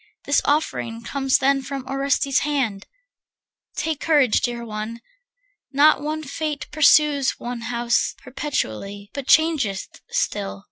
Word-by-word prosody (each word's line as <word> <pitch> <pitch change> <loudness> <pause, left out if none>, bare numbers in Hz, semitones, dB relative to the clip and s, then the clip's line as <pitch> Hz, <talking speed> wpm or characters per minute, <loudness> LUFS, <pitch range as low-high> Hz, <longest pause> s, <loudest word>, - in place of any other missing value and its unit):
This 285 - +3
offering 235 -6 -1
comes 270 +2 +1
then 275 +1 +2
of 270 0 -6
Orestes' 275 +1 +1
hand. 255 -9 -1 0.9
Take 320 -3 -2
courage, 290 -8 +3
dear 240 -3 -2
one. 215 +1 -5 0.7
Not 290 +1 +5
one 310 +1 -3
fate 300 +1 -4
pursues 300 -2 +4
One 240 -1 -5
house 240 0 0
perpetually, 205 - -4
but 280 -2 -6
changeth 295 -12 +2
still. 95 0 -2
275 Hz, 120 wpm, -22 LUFS, 235-295 Hz, 0.9 s, Not